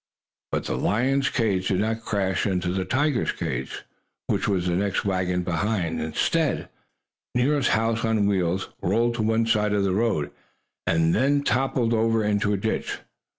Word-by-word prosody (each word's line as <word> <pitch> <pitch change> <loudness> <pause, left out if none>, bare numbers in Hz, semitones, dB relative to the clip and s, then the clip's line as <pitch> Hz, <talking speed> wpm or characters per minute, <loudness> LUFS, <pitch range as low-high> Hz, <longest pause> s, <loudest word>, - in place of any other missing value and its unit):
But - - -1
the - - -3
lion's 135 +7 +1
cage 100 -6 0
did 95 - +1
not 110 +1 -1
crash 100 -2 -1
into 90 -2 -1
the 95 -1 -1
tiger's 135 +5 +1
cage, 65 +1 -4 0.4
which - - 0
was 95 -4 0
the 90 -1 +1
next 100 +1 0
wagon 90 -2 0
behind. 90 0 -1
Instead, 80 - 0 0.7
Nero's 135 +2 +2
house 115 0 0
on 110 -2 +2
wheels 95 -2 0
rolled 120 +1 +1
to 120 - -2
one 110 +1 +2
side 105 -2 +1
of 100 -1 +2
the 95 -1 +1
road 100 -8 0 0.6
and 130 - +2
toppled 120 -1 +1
over 115 0 +2
into 105 0 +1
a 100 - +1
ditch. 110 +3 -2
105 Hz, 155 wpm, -25 LUFS, 95-115 Hz, 0.7 s, Nero's